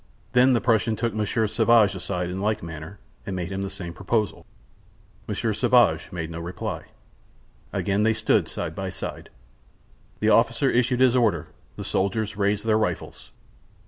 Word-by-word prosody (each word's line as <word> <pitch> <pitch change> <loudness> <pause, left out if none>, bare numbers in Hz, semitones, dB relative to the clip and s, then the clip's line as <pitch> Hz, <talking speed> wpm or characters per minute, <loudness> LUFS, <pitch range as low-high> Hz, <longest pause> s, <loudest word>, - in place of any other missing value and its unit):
Then 125 +1 +5
the 120 - +2
Prussian 115 -1 +2
took 115 0 -1
Monsieur 110 +1 0
Sauvage 110 -1 +4
aside 90 -1 -3
in 95 +1 -4
like 110 -1 0
manner, 80 +4 -8 0.3
and 95 - -4
made 90 0 -4
him 95 0 -3
the 100 - -3
same 85 -3 -6
proposal. 105 +4 -2 0.8
Monsieur - - -1
Sauvage - - +3
made 85 -2 -4
no 85 - -5
reply. 85 +2 -5 0.9
Again 100 +1 0
they 110 +1 +3
stood 110 - +2
side - - -4
by - - -4
side. - - -7 0.9
The 110 - +2
officer 115 +4 +3
issued 125 +1 +2
his 130 -1 +5
orders; 105 -11 +1 0.3
the - - -6
soldiers 105 +2 -1
raised 100 +1 0
their 110 -1 +3
rifles. 110 - -3
105 Hz, 160 wpm, -25 LUFS, 95-115 Hz, 0.9 s, Then